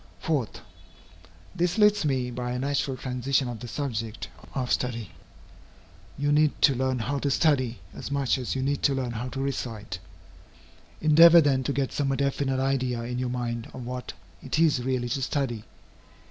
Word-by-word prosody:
4. 145 Hz, -8 st, 0 dB, 1.1 s
This 175 Hz, +4 st, 0 dB
leads 210 Hz, -4 st, +4 dB
me 130 Hz, -3 st, 0 dB
by 125 Hz, 0 st, -3 dB
a -, -, -2 dB
natural 135 Hz, 0 st, -1 dB
transition 130 Hz, +1 st, 0 dB
to 120 Hz, -, -3 dB
the 120 Hz, +1 st, -8 dB
subject 115 Hz, -5 st, -4 dB, 0.3 s
of 130 Hz, -2 st, -2 dB
study. 115 Hz, -6 st, -1 dB, 1.1 s
You 145 Hz, +1 st, +1 dB
need 150 Hz, 0 st, +3 dB
to 140 Hz, -, +7 dB
learn 130 Hz, 0 st, 0 dB
how 140 Hz, +4 st, -2 dB
to 140 Hz, -, 0 dB
study, 130 Hz, -5 st, +2 dB, 0.2 s
as -, -, -7 dB
much 140 Hz, -1 st, +1 dB
as 125 Hz, -, -3 dB
you 130 Hz, -, -1 dB
need 140 Hz, +1 st, 0 dB
to 140 Hz, -, +3 dB
learn 130 Hz, -2 st, -2 dB
how 120 Hz, +2 st, -4 dB
to 135 Hz, -, -6 dB
recite. 115 Hz, -8 st, -4 dB, 1.0 s
Endeavor 165 Hz, +2 st, +8 dB
then 140 Hz, -4 st, +2 dB
to 140 Hz, -, 0 dB
get 140 Hz, -1 st, -1 dB
some 140 Hz, -2 st, 0 dB
definite 140 Hz, -1 st, 0 dB
idea 130 Hz, -3 st, 0 dB
in 125 Hz, +1 st, -3 dB
your 125 Hz, -1 st, -1 dB
mind 120 Hz, -2 st, -3 dB
of 125 Hz, -2 st, -7 dB
what 125 Hz, +1 st, -5 dB, 0.3 s
it 130 Hz, -, -3 dB
is 155 Hz, -6 st, +3 dB
really 125 Hz, -1 st, -1 dB
to 135 Hz, +3 st, -1 dB
study. 125 Hz, -5 st, -2 dB
130 Hz, 175 wpm, -27 LUFS, 125-140 Hz, 1.1 s, Endeavor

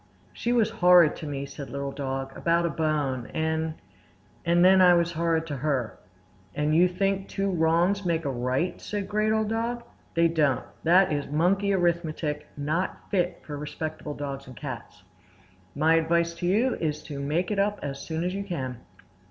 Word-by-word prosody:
"She 235 Hz, -, -2 dB
was 235 Hz, -3 st, +3 dB
horrid 175 Hz, -3 st, +6 dB
to 155 Hz, -, -7 dB
me," 140 Hz, -1 st, -4 dB
said 140 Hz, 0 st, -8 dB
Little 140 Hz, 0 st, -4 dB
Dog, 135 Hz, -1 st, -4 dB
"about 170 Hz, 0 st, +1 dB
a 170 Hz, -, 0 dB
bone; 145 Hz, -6 st, -1 dB
and—and 160 Hz, +2 st, -2 dB
then 190 Hz, 0 st, +7 dB
I 180 Hz, -1 st, +7 dB
was 170 Hz, 0 st, +2 dB
horrid 165 Hz, 0 st, 0 dB
to 145 Hz, -4 st, -4 dB
her." 130 Hz, -5 st, -2 dB, 0.6 s
"And 150 Hz, +1 st, +1 dB
you 175 Hz, +2 st, +6 dB
think 195 Hz, +2 st, -1 dB
two 195 Hz, 0 st, -1 dB
wrongs 175 Hz, +4 st, +2 dB
make 165 Hz, -3 st, 0 dB
a 140 Hz, -, 0 dB
right?" 130 Hz, +7 st, -1 dB
said 205 Hz, -2 st, -4 dB
Great 215 Hz, +1 st, +1 dB
Old 220 Hz, -1 st, +1 dB
Dog. 235 Hz, +2 st, -2 dB, 0.3 s
"They 170 Hz, 0 st, +5 dB
don't. 150 Hz, -6 st, +1 dB, 0.2 s
That 180 Hz, +3 st, +5 dB
is 145 Hz, -1 st, -2 dB
monkey 185 Hz, +7 st, +2 dB
arithmetic, 170 Hz, -4 st, -1 dB
not 155 Hz, +6 st, -3 dB
fit 180 Hz, -3 st, 0 dB
for 145 Hz, -1 st, -6 dB
respectable 150 Hz, 0 st, -5 dB
dogs 140 Hz, -2 st, -5 dB
and 130 Hz, -, -11 dB
cats. 120 Hz, -8 st, -8 dB, 0.7 s
My 155 Hz, +3 st, +3 dB
advice 170 Hz, +1 st, +1 dB
to 170 Hz, +1 st, -3 dB
you 225 Hz, +8 st, +2 dB
is 150 Hz, -2 st, -2 dB
to 145 Hz, -3 st, -7 dB
make 155 Hz, +7 st, -1 dB
it 205 Hz, -, 0 dB
up 205 Hz, +1 st, +1 dB
as 140 Hz, -1 st, -4 dB
soon 160 Hz, 0 st, -3 dB
as 180 Hz, +1 st, -1 dB
you 200 Hz, +1 st, -3 dB
can." 130 Hz, -, -4 dB
165 Hz, 175 wpm, -26 LUFS, 145-180 Hz, 0.7 s, then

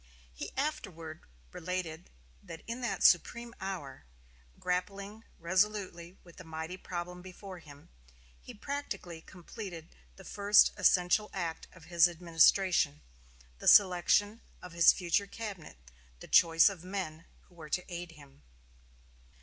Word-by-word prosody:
He -, -, -7 dB
afterward 170 Hz, -, -4 dB, 0.3 s
related 175 Hz, -, -5 dB, 0.3 s
that 165 Hz, -, -11 dB
in 235 Hz, +2 st, -6 dB
that 240 Hz, -, -2 dB
supreme 235 Hz, +6 st, +3 dB
hour, 170 Hz, -, -6 dB, 0.5 s
grappling 200 Hz, +4 st, -4 dB
resolutely 185 Hz, -1 st, -1 dB
with 170 Hz, -2 st, -17 dB
the 185 Hz, -, -10 dB
mighty 160 Hz, +1 st, -6 dB
problem 180 Hz, -1 st, -6 dB
before 185 Hz, 0 st, -10 dB
him, 145 Hz, -3 st, -16 dB, 0.5 s
he -, -, -11 dB
practically 205 Hz, -, -6 dB
completed 175 Hz, -2 st, -10 dB, 0.2 s
the -, -, -14 dB
first 205 Hz, 0 st, +4 dB
essential 185 Hz, +1 st, +3 dB
act 170 Hz, -4 st, -4 dB
of 185 Hz, -, -17 dB
his 170 Hz, +1 st, +5 dB
administration, 170 Hz, -, +2 dB, 0.6 s
the -, -, -6 dB
selection 205 Hz, +3 st, +5 dB, 0.2 s
of 180 Hz, -, -11 dB
his 170 Hz, 0 st, +7 dB
future 180 Hz, +3 st, 0 dB
cabinet 200 Hz, -, -8 dB, 0.4 s
the -, -, -11 dB
choice 165 Hz, -1 st, +6 dB
of 195 Hz, -5 st, -2 dB
the 180 Hz, -, -13 dB
men 175 Hz, -4 st, -5 dB, 0.2 s
who -, -, -26 dB
were 160 Hz, -3 st, -11 dB
to 180 Hz, -, -2 dB
aid 175 Hz, -1 st, -7 dB
him. 140 Hz, -, -17 dB
180 Hz, 130 wpm, -31 LUFS, 165-200 Hz, 0.6 s, his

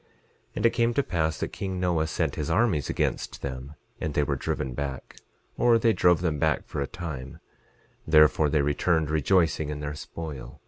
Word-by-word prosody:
11:18 -, -, -36 dB, 0.5 s
And -, -, -1 dB
it -, -, +7 dB
came 120 Hz, 0 st, +1 dB
to 140 Hz, -, +2 dB
pass 80 Hz, -6 st, -1 dB
that -, -, -1 dB
king 95 Hz, -2 st, -4 dB
Noah 85 Hz, -3 st, +1 dB
sent -, -, -1 dB
his 75 Hz, -, -3 dB
armies 80 Hz, -, +1 dB
against -, -, -2 dB
them, 65 Hz, +2 st, -6 dB, 0.2 s
and 80 Hz, -2 st, -3 dB
they 75 Hz, -, +3 dB
were -, -, -1 dB
driven 65 Hz, -, -3 dB
back, 70 Hz, 0 st, -5 dB, 0.4 s
or 120 Hz, -1 st, +5 dB
they 115 Hz, 0 st, +3 dB
drove 90 Hz, -4 st, +3 dB
them 80 Hz, -5 st, -1 dB
back -, -, +1 dB
for 70 Hz, -, -4 dB
a 70 Hz, -, -1 dB
time; 70 Hz, -6 st, -7 dB, 0.7 s
therefore, 75 Hz, -1 st, +5 dB
they 75 Hz, -1 st, +2 dB
returned 80 Hz, +2 st, +1 dB
rejoicing 80 Hz, -1 st, +2 dB
in 75 Hz, -1 st, -4 dB
their 75 Hz, 0 st, -4 dB
spoil. 75 Hz, -5 st, -8 dB
80 Hz, 190 wpm, -26 LUFS, 75-90 Hz, 0.7 s, it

